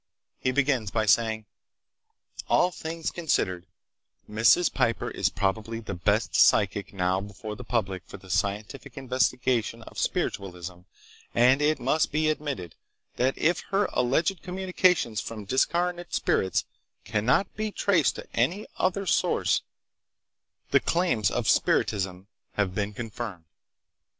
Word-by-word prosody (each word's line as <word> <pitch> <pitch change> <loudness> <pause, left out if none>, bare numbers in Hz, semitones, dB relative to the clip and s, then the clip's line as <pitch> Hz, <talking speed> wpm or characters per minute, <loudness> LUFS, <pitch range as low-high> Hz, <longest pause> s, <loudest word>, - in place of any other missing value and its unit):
He 130 - 0
begins 130 -5 +1
by 110 +1 0
saying: 110 +1 +2 1.0
"All 180 - +4
things 165 -1 -4
considered, 95 - -1 0.6
Mrs. 115 +11 +4
Piper 115 - 0
is - - +1
probably 110 +3 -2
the 110 -3 -6
best 100 +5 0
'psychic' 100 -1 +3
now 95 0 0
before 105 +1 -7
the 125 - -9
public 100 -6 -1
for - - -9
the 95 -1 -11
scientific 105 +8 -2
investigation 125 -3 0
of - - -9
spiritualism 90 -2 -3 0.6
and 130 +4 +5
it 155 +1 +2
must 145 +6 +1
be 155 +1 +2
admitted 140 - -4 0.4
that 130 +2 +1
if 170 +2 +2
her 200 +1 +2
alleged 150 +10 +1
communications 180 - +1
from 110 -3 -7
discarnate 175 - 0
spirits 95 - +1 0.4
cannot 110 - +1
be 215 +1 -2
traced 185 -7 +2
to - - -8
any 170 - +1
other 190 +2 0
source, - - +2 1.1
the - - +6
claims 130 - +1
of - - -2
spiritism 95 -2 +1 0.3
have 100 -3 0
been 100 +1 -2
confirmed." 110 -5 -6
115 Hz, 125 wpm, -27 LUFS, 100-155 Hz, 1.1 s, the